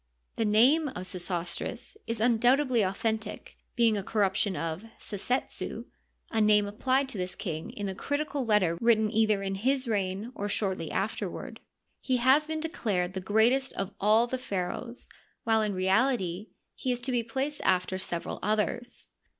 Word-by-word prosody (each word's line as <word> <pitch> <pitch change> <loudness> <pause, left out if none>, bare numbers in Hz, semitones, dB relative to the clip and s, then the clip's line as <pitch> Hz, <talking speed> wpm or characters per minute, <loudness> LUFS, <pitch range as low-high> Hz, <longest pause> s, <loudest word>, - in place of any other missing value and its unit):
The 225 - 0
name 255 +10 +5
of 185 -9 -6
Sesostris 175 - -4
is 230 -1 -2
undoubtedly 245 +2 +3
authentic, 215 +2 -2 0.2
being 230 -2 +4
a 205 - -1
corruption 200 -1 +1
of 165 +3 -3 0.2
Sesetsu—?i 225 +1 -4
name 210 -1 +5
applied 260 +6 +1
to 215 - -5
this 180 0 -3
king 160 -5 -4
in 205 -1 -5
a 190 - -3
critical 285 +5 -2
letter 195 -7 +2
written 220 -2 +4
either 215 -3 +2
in 195 0 -2
his 255 +6 0
reign 200 +1 -1
or 205 -3 -3
shortly 195 -3 -1
after - - -2
ward. - - -8 0.4
He 260 -1 0
has 265 +5 +4
been 315 0 -2
declared 200 - -1
the 190 - -3
greatest 230 +7 +2
of 195 +1 -3
all 215 +3 +4
the 255 +1 -3
pha 185 -8 -2
raohs, 240 0 -7 0.4
while 225 -1 +3
in 210 -2 -1
reality 190 0 +1 0.3
he 255 - -2
is 245 - -1
to 260 +2 -1
be 245 -1 +2
placed 265 +6 -2
after 185 0 +1
several 170 -2 -4
others. 215 +4 -1
215 Hz, 160 wpm, -29 LUFS, 195-245 Hz, 0.4 s, name